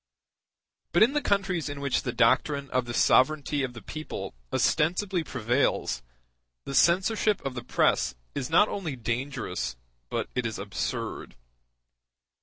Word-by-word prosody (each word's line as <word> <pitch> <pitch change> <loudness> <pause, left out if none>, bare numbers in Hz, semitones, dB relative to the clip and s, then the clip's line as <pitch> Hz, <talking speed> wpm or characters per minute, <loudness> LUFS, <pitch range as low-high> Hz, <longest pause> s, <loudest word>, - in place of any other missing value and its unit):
But 175 - +6
in 245 +5 +4
the 295 - +1
countries 190 - 0
in 145 0 -5
which 140 -2 0
the - - -2
doctrine 135 +4 +2
of 130 -1 +1
the 120 - -5
sovereignty 145 +1 +3
of 130 -2 -2
the 120 - -10
people 155 +1 -6 0.2
ostensibly 180 +2 +1
prevails, 120 - 0 0.6
the 140 - -5
censorship 195 +7 +3
of 135 - -2
the 125 -1 -6
press - - +2 0.2
is 130 - -3
not 175 +6 +5
only 175 -10 -4
dangerous, 120 - -3 0.3
but - - -2
it 125 -2 0
is 110 - -5
absurd. 95 -9 -4
140 Hz, 140 wpm, -27 LUFS, 125-175 Hz, 0.6 s, But